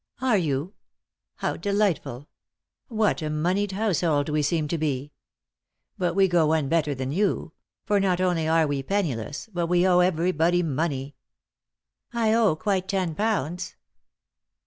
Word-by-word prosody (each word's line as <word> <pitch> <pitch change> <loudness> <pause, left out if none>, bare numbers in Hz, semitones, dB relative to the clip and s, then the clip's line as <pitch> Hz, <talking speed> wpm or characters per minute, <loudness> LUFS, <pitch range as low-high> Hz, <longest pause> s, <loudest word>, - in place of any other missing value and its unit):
" - - -42
Are 255 -3 +2
you? 160 0 -1 0.6
How - - -2
delightful 200 - -1 0.6
I - - -13
What 215 -5 +2
a 155 - -2
moneyed 180 +6 0
household 170 -8 +1
we 150 0 +1
seem 150 +1 0
to 170 - -1
be 145 -1 -2 0.8
1 180 - 0
But - - -2
we 195 -1 +5
go 175 -3 +3
one 155 -2 +1
better 150 -3 +1
than 130 0 -3
you; 185 -1 -1 0.3
for 205 0 +2
not 185 -2 +1
only 175 -4 +1
are 160 0 +3
we 145 -2 -1
penniless 145 - -2
but 175 -1 -1
we 175 +1 +3
owe 180 -1 +4
everybody 175 0 +2
money." 145 -3 -2 1.0
"I 225 -2 +2
owe 225 -8 +3
quite 190 +2 -1
ten 185 -4 -1
pounds." 180 -3 -2
170 Hz, 155 wpm, -25 LUFS, 150-195 Hz, 1.0 s, we